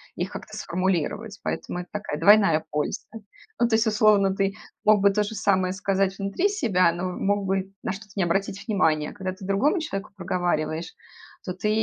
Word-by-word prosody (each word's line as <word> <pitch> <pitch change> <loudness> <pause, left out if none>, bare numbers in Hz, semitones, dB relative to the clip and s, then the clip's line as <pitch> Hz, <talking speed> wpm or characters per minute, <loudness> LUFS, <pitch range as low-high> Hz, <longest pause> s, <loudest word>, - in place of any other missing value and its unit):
их - - -3
как-то - - -8
сформулировать. 190 +4 -2
Поэтому 180 - -3
это 180 - -8
такая 205 -8 -4
двойная 180 -4 +5
польза. 150 0 -2 0.5
Ну, 235 - +4
то 225 - +2
есть, 225 +1 +3
условно, 210 -2 +4
ты 195 0 0 0.3
мог 210 -2 +5
бы 200 0 +5
то 210 +1 +1
же 215 +1 -5
самое 190 -3 +1
сказать 195 0 0
внутри 200 - 0
себя, 195 - +2
но 175 +2 -4
мог 200 +2 0
бы 190 0 -1
на - - -1
что-то 200 0 -9
не 195 - +1
обратить 195 +3 -1
внимание. 160 -7 +1
А - - -12
когда 190 -2 -4
ты 190 0 -11
другому 265 - +2
человеку 195 -13 -5
проговариваешь, 175 -3 -2 0.5
то 180 - -3
ты 210 +3 -2
195 Hz, 190 wpm, -25 LUFS, 180-210 Hz, 0.5 s, двойная